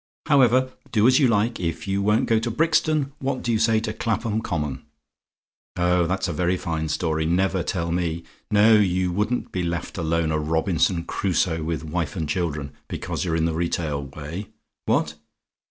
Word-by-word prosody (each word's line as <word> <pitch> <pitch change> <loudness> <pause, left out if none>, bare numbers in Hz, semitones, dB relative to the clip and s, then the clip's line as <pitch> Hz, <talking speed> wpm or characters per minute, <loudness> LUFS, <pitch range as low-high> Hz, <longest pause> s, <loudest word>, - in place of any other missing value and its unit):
"However, 130 -3 +4 0.2
do 110 -3 +3
as 130 +3 +6
you 135 - +5
like. 115 +1 +1
If 85 +2 -3
you 100 0 0
won't 105 +3 +2
go 115 -2 +3
to 115 +2 -2
Brixton, 155 +1 +1
what 135 -1 -2
do 120 - 0
you 110 - +2
say 110 0 +3
to 110 -1 -3
Clapham 110 0 -1
Common? 75 - -3 0.9
Oh, 90 -1 +2
that's 95 +2 -1
a 85 - -2
very 90 +3 +1
fine 80 -2 -3
story! 80 -1 0
Never 95 +2 +1
tell 85 -1 -2
me! 85 -1 -1 0.3
No; 105 +2 +5
you 90 -2 +1
wouldn't 105 +7 -1
be 90 - -2
left 85 +1 -3
alone, 80 -1 0
a 80 - +1
Robinson 80 +2 +1
Crusoe 85 -2 0
with 80 0 -3
wife 80 +1 -3
and 80 -4 -2
children, 75 -5 -2 0.2
because - - -4
you're 85 -3 -1
in 80 0 +1
the 85 - 0
retail 80 -3 -2
way. 75 +8 -7 0.4
What? 75 - +1
90 Hz, 180 wpm, -24 LUFS, 80-110 Hz, 0.9 s, as